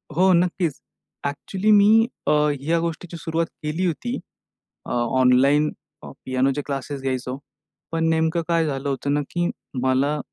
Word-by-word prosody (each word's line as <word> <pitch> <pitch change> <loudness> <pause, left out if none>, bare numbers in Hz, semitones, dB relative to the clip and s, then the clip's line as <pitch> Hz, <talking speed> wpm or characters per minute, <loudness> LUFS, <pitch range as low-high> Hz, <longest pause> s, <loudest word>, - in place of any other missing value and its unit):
हो 185 +3 +5
नक्कीच. 175 -3 +1 0.5
ॲक्चुअली 190 +9 -1
मी 215 +2 +6 0.2
अ, - - +4 0.3
ह्या 165 +5 +1
गोष्टीची 170 +1 -4
सुरुवात 165 0 -1 0.2
केली 155 +5 -1
होती. 240 - -2 0.7
अ, - - -8 0.3
ऑनलाईन 135 +4 +4 0.3
अ, - - -8
पियानोचे 130 +2 +1
क्लासेस 140 0 -4
घ्यायचो. 130 -1 -3 0.5
पण 165 0 0
नेमकं 160 +1 +1
काय 165 -1 +2
झालं 140 -1 -2
होतं 140 +1 -1
ना 145 - +1
की 175 0 0 0.3
मला 135 +3 +2
155 Hz, 140 wpm, -23 LUFS, 135-175 Hz, 0.7 s, मी